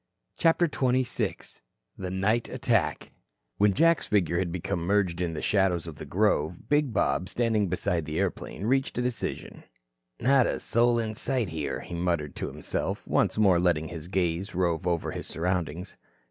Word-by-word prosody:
CHAPTER 170 +1 +3
XXVI 130 -4 -1 0.3
THE 95 - -5
NIGHT 105 +5 0
ATTACK - - 0 0.5
When 100 -1 +3
Jack's 165 -1 +3
figure 90 -4 +2
had 90 -2 -1
become 90 0 -2
merged 90 -1 +1
in 85 -2 -1
the - - -5
shadows 95 -5 +2
of 80 -3 -8
the 75 - -8
grove, 90 -2 0
big 145 -3 +2
Bob, 70 -3 0
standing 110 -4 +1
beside 85 -2 -1
the 75 0 -4
airplane, 100 - -3
reached 135 +2 +1
a - - +1
decision. 125 -2 -4 0.6
"Not 130 0 +4
a - - -2
soul 120 +1 +2
in 110 -2 -1
sight 125 -2 -1
here," 80 -2 -3
he - - -9
muttered 85 -4 -1
to - - -3
himself, - - -4
once - - +1
more 95 -5 +5
letting 85 -3 +1
his 85 -2 -7
gaze 90 +1 -1
rove 90 -1 0
over 85 -2 0
his - - -6
surroundings. 90 +1 -2
95 Hz, 165 wpm, -27 LUFS, 85-115 Hz, 0.6 s, more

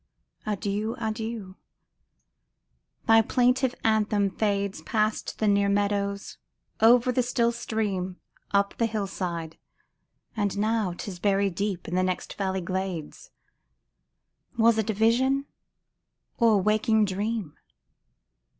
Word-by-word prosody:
Adieu! 210 +2 -2
adieu! 220 -3 -4 1.5
thy 225 0 +6
plaintive 250 +2 +2
anthem 210 -2 +2
fades 200 -3 -1
Past 215 +5 -1
the 215 - 0
near 200 0 +3
meadows, 200 0 -1 0.4
over 240 +3 +5
the 250 - +2
still 235 -1 +1
stream, 205 -6 -3 0.3
Up 200 0 +1
the 230 - +3
hill 215 -2 -2
side; 170 -4 -5 0.8
and 205 -2 -1
now 215 -3 0
'tis 180 0 -7
buried 200 -1 +1
deep 195 -1 -3
In 175 - -5
the 185 - +2
next 185 -1 -2
valley 190 -1 -2
glades: 185 -3 -4 1.3
Was 225 -1 +4
it 220 0 -1
a - - +2
vision, 260 +6 +2 0.9
or 230 -2 +5
a - - +5
waking 215 +2 +2
dream 200 -3 -3
205 Hz, 115 wpm, -26 LUFS, 195-225 Hz, 1.5 s, thy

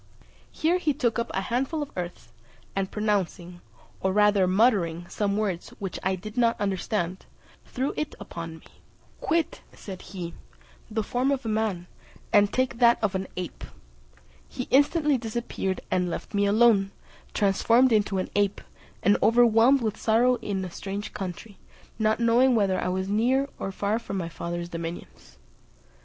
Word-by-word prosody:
Here 340 +3 +1
he 300 -5 0
took 235 -5 0
up 235 - -2
a 190 - -1
handful 265 +9 -1
of 285 - -10
earth, 175 -1 -6 0.4
and 195 -1 -1
pronouncing, 190 -4 -2 0.4
or 190 - 0
rather 205 -1 +4
muttering, 185 -5 +2
some 200 +1 -1
words 195 -5 -2
which 195 -3 -5
I 190 0 0
did 215 +5 -9
not 235 -2 +2
understand, 190 -2 -2 0.4
threw 265 +3 -2
it 305 -1 -3
upon 165 -1 -7
me. - - -19 0.5
"Quit," 330 0 0
said 190 -3 -9
he, 175 -2 -7 0.6
"the 220 0 -1
form 250 +5 0
of 275 -3 -1
a - - -1
man, 215 -5 -1 0.5
and 205 -1 +5
take 255 -2 0
that 235 -1 +6
of 205 - +1
an 190 0 -2
ape." 180 -2 -5 0.9
He 250 - -4
instantly 290 0 +3
disappeared, 225 -4 -3
and 180 -1 +1
left 170 - -6
me 200 0 +2
alone, 210 -2 +4 0.5
transformed 230 +5 +4
into 210 -3 +2
an 185 - -3
ape, 205 -1 +1 0.4
and 205 - +4
overwhelmed 235 +3 +5
with 220 -1 -2
sorrow 240 +3 +3
in 190 -4 -3
a 180 - -7
strange 200 +3 -5
country, 195 +2 -7 0.4
not 215 +1 +2
knowing 240 +2 +4
whether 195 -4 +2
I - - -1
was 190 +1 -1
near 245 +7 +2
or 195 - -3
far 205 +3 -1
from 200 -4 -5
my 170 -3 -3
father's 170 +1 -5
dominions. 165 0 -8
205 Hz, 160 wpm, -26 LUFS, 190-235 Hz, 0.9 s, that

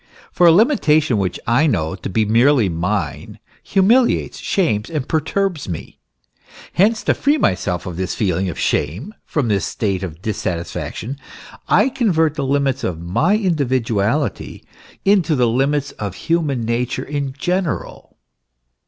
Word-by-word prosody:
For 175 - +4
a - - +8
limitation 155 - +3
which 95 -2 -2
I 125 +8 +3
know 80 - 0
to 95 - -6
be 110 +3 +1
merely 115 0 +3
mine 90 +5 -3 0.2
humiliates, 225 +6 +2
shames, 115 - 0
and 150 -5 -3
perturbs 160 - -1
me. 85 - -7 0.7
Hence 215 +5 +2
to - - +2
free 290 +2 +1
myself 90 - 0
from 90 -2 -6
this 95 0 -2
feeling 95 -2 0
of - - -6
shame, 95 - -1
from 145 -6 -1
this 100 -3 +1
state 100 -4 -2
of 85 -4 -6
dissatisfaction, 105 +5 -4 0.5
I 210 +8 +4
convert 170 - +1
the 140 -4 -3
limits 140 -1 0
of 85 -3 -2
my 95 - +1
individuality 130 - -1 0.4
into 190 -5 +3
the 125 -3 +2
limits 135 +4 0
of 100 -3 -6
human 155 -7 -1
nature 120 +2 -2
in 140 -2 -3
general. 175 - -3
135 Hz, 140 wpm, -19 LUFS, 100-165 Hz, 0.7 s, a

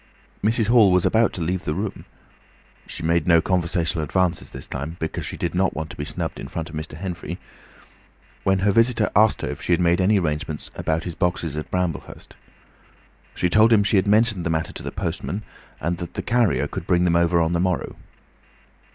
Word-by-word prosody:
Mrs. 110 +1 +2
Hall 110 -3 +5
was 90 -1 +3
about 115 +1 +3
to 85 - -3
leave 90 +2 -2
the 75 - -2
room—she 100 -4 -9
made 85 -1 +1
no 85 -1 +6
conversational 85 -2 0
advances 90 +1 0
this 65 - -9
time, 80 +5 -5
because 80 - -3
she - - -6
did 85 - -2
not 95 +1 +1
want 80 +1 -4
to - - -9
be 75 - -5
snubbed - - -3
in - - -6
front 80 -1 -5
of - - -8
Mr. 75 0 -6
Henfrey—when 90 +2 -6
her 100 +2 +2
visitor 115 +1 +3
asked 110 +1 +4
her - - -1
if - - -6
she 90 - +1
had 85 - +2
made 85 +1 +3
any 100 +3 +4
arrangements 75 -3 -2
about 80 +1 -1
his 90 - -4
boxes 85 -3 -1
at 75 - -5
Bramblehurst. 90 -3 -4 1.0
She 90 - +1
told 110 +5 +5
him 105 -3 +5
she 100 +1 +2
had 95 - +2
mentioned 105 -3 +3
the 80 - -1
matter 80 -1 -1
to - - -7
the - - -5
postman, 90 +3 -4 0.4
and 85 +2 -2
that 85 - -7
the - - -3
carrier 120 -5 +2
could 85 - -6
bring 90 -1 +3
them 85 -1 +2
over 85 0 +3
on 80 0 +1
the 85 - +1
morrow. 90 -1 -1
90 Hz, 205 wpm, -23 LUFS, 85-100 Hz, 1.0 s, no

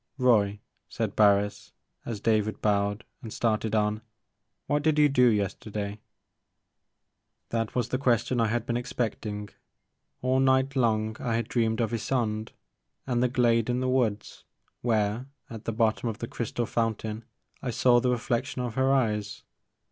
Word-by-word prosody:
" - - -49
Roy," 105 -6 +3 0.3
said - - -3
Barris 100 -1 +2 0.3
as 115 -3 -3
David 110 0 +1
bowed 100 0 +1 0.2
and 115 -4 -8
started 110 -1 0
on, 105 0 +1 0.3
" - - -53
what 145 0 +1
did 155 0 +2
you 150 -1 +6
do 125 -3 +4
yesterday? 105 -1 -2 0.7
" - - -53
This 115 -1 -2
was 120 -2 0
the 130 - -1
question 120 -1 +1
that 115 - +3
I - - +1
had 120 +1 -1
been 120 0 -1
expect 120 -3 -3
ing. 105 0 -5 0.7
All 130 +1 +2
night 130 +1 +3
long 110 -3 +1
I 115 -2 -1
had 115 - -1
dreamed 115 -1 0
of 115 - 0
Ysonde 110 -2 -1 0.5
and 120 -2 0
the 125 - +3
glade 120 -2 +2
in 125 0 +1
the 130 - -1
woods, 120 -5 -1 0.4
where, 110 +1 0 0.2
at 110 -1 -8
the - - -1
bottom 115 +1 +1
of 110 - -5
the 115 - -5
crystal 120 +1 -3
fountain, 110 -1 -2 0.4
I 125 - -3
saw 120 +1 +4
the 125 +1 +1
reflection 125 +2 -1
of 120 -3 -3
her 130 +2 +2
eyes. 105 -6 0
115 Hz, 170 wpm, -27 LUFS, 105-125 Hz, 0.7 s, you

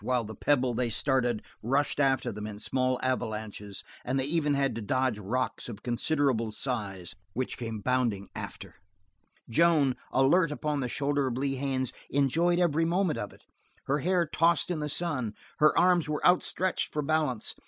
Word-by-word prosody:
While 125 +1 +1
the 110 0 -7
pebble 130 +2 +1
they 120 0 0
started 120 -1 0 0.2
rushed 140 +6 0
after 135 -2 +2
them 105 +1 -6
in 105 -1 -7
small 130 +3 0
avalanches, 110 -5 -3 0.2
and 130 +2 0
they - - +1
even 150 -1 +1
had 135 -2 +1
to 115 - -5
dodge 130 +1 0
rocks 125 +6 -2
of 105 -3 -8
considerable 125 -1 +1
size 105 -7 -4 0.2
which 130 +1 -2
came 115 -3 -5
bounding 120 -5 0
after, - - -8 0.7
Joan, 145 0 +3 0.2
alert 150 +6 +4
upon 150 0 -2
the 125 -2 -2
shoulder 140 +1 0
of 125 -1 -2
Lee 135 0 -1
Haines, 130 -2 -1 0.2
enjoyed 165 +6 +2
every 165 -3 +2
moment 175 0 +1
of 105 - -4
it; - - -19 0.4
her 145 +2 0
hair 175 +3 +2
tossed 165 +2 +2
in 170 - -1
the 150 0 -2
sun, 145 -8 -1 0.2
her 150 0 +5
arms 175 -3 +4
were 150 - -2
outstretched 180 +1 +2
for 150 - -2
balance. 150 -6 0
135 Hz, 170 wpm, -29 LUFS, 120-150 Hz, 0.7 s, her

